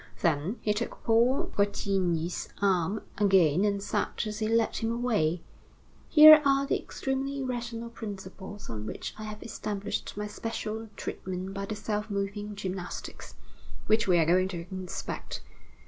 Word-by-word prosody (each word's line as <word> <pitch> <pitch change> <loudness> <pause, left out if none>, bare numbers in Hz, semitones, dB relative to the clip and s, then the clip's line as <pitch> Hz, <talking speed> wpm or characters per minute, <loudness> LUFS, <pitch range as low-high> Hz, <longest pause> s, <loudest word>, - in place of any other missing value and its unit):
Then, 170 +7 +1
he 210 - +1
took 225 +3 -4
Paul 235 +4 +3
Bretigny's 185 -4 0
arm 195 0 +1 0.2
again, 190 -4 +4
and 200 -1 +1
said - - 0 0.2
as 215 0 -4
he 215 - 0
led 225 0 +2
him 225 0 -1
away: 210 -9 0 0.7
"Here 310 0 +10
are 275 -1 +3
the - - 0
extremely 270 +1 -3
rational 235 -2 -4
principles 205 -2 -8
on 110 -1 -5
which - - -5
I 215 - -5
have 215 0 -7
established 205 -3 -4
my 210 - -2
special 220 +1 -4
treatment 185 +1 -5
by 195 0 -3
the 215 - -3
self 210 +1 -3
moving 205 +1 -3
gymnastics, 190 -2 -6 0.5
which 220 0 +3
we 180 -2 +5
are 165 - +4
going 185 +3 +4
to 170 -3 -5
inspect. 185 - -5
205 Hz, 145 wpm, -29 LUFS, 185-225 Hz, 0.7 s, Here